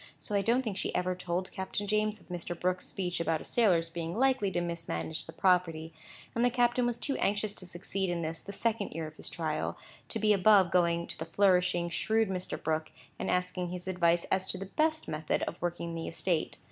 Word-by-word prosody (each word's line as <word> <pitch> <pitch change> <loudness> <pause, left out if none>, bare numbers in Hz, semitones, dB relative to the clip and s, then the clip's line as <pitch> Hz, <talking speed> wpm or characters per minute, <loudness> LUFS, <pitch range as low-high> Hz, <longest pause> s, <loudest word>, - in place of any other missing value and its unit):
So - - -4
I 200 - +3
don't 240 +5 +2
think 210 -5 -3
she - - -2
ever 185 0 +1
told 180 0 -3
Captain 190 +2 -3
James 215 +1 +1
of - - -22
Mr. 175 -1 -4
Brooke's 185 0 0
speech 180 -3 -2
about 165 -1 +1
a - - -10
sailor's 175 -8 +3
being 170 +2 -4
likely 260 -5 +3
to 185 - -1
mismanage 170 - -3
the - - -7
property; 165 -2 +2 0.4
and 235 - +1
the 245 - +5
captain 245 0 +2
was 240 -1 -1
too 275 +3 -1
anxious 205 +1 +1
to 185 - -7
succeed 185 +2 -2
in 170 -1 -1
this, 160 +1 -2
the 200 - -7
second 215 0 0
year 165 0 -3
of 155 0 -9
his - - -3
trial, 155 -3 -2 0.3
to - - -1
be 215 -1 +4
above 195 -2 +5
going 170 -1 +3
to - - -6
the 160 - -3
flourishing, 180 -1 +3
shrewd 220 +4 +1
Mr. 185 -1 -3
Brooke, 155 0 -1 0.3
and - - -2
asking 180 0 0
for 175 - -6
his 180 0 -6
advice 175 -2 +3
as 190 0 +1
to - - -1
the 195 - -5
best 315 +9 +1
method 155 0 -1
of 170 - -4
working 170 -1 -2
the 165 0 -4
estate. 165 -1 -1
180 Hz, 225 wpm, -31 LUFS, 170-205 Hz, 0.4 s, the